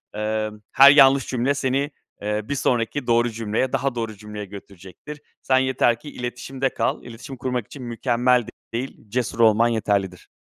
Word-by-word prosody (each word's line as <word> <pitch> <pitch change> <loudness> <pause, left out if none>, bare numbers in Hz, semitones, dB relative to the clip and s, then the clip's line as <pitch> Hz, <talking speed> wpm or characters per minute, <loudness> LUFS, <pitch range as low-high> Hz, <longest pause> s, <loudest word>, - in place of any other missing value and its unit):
Eee, 110 0 -2 0.2
her 140 +1 +9
yanlış 135 -2 +6
cümle 130 +2 0
seni, 140 +2 -1 0.3
eee, 105 +1 -1
bir 145 - -1
sonraki 125 0 -1
doğru 120 +1 +3
cümleye, 115 +3 -2
daha 135 -2 0
doğru 115 -2 -4
cümleye 105 0 -8
götürecektir. 100 - -11 0.2
Sen 130 - +2
yeter 125 -3 +2
ki 150 - -10
iletişimde 130 +2 -4
kal, - - -2
iletişim 120 +3 -10
kurmak 125 -2 -2
için 135 -3 -10
mükemmel 120 0 +1 0.3
değil, 125 +3 -4
cesur 120 -1 -2
olman 115 0 +5
yeterlidir. 100 -5 -1
120 Hz, 155 wpm, -23 LUFS, 110-130 Hz, 0.3 s, her